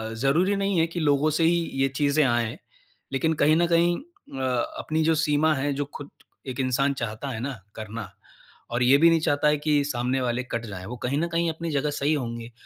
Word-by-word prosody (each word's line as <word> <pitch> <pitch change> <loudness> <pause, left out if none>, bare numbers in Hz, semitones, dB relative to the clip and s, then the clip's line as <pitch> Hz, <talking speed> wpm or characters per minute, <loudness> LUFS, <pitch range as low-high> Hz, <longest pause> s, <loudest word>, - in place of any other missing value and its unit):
ज़रूरी 160 - +2
नहीं 195 -3 0
है 165 - +4
कि 170 +1 -5
लोगों 145 0 +2
से 165 - +2
ही 170 +1 +4 0.3
ये 135 - +4
चीज़ें 145 +1 +2
आएँ। 120 -3 0 0.6
लेकिन 160 +4 +1
कहीं 155 +2 +5
न 170 +1 +3
कहीं 170 +1 +3
अ, 280 - -12 0.4
अपनी 155 +1 -1
जो 160 0 +3
सीमा 150 +1 +2
है, 140 +1 -1
जो 145 +1 -2
खुद 145 - -8 0.4
एक 130 0 -5
इंसान 135 +2 +1
चाहता 115 +2 -4
है 115 -4 -4
ना 130 -3 -4 0.2
करना 110 -2 -6 0.6
और 120 +1 +1
ये 135 +3 +6
भी 170 +1 +7
नहीं 165 -1 +3
चाहता 145 -1 +1
है 150 0 +3
कि 150 -1 +1
सामने 130 -1 -1
वाले 125 0 -1
कट 115 -2 -4
जाएँ, 95 -3 -7
वो 120 +3 -7
कहीं 135 +3 0
न 170 - 0
कहीं 170 0 +1
अपनी 165 0 -5
जगह 145 +1 0
सही 145 +2 0
होंगे। 120 -4 -4
145 Hz, 220 wpm, -25 LUFS, 125-160 Hz, 0.6 s, भी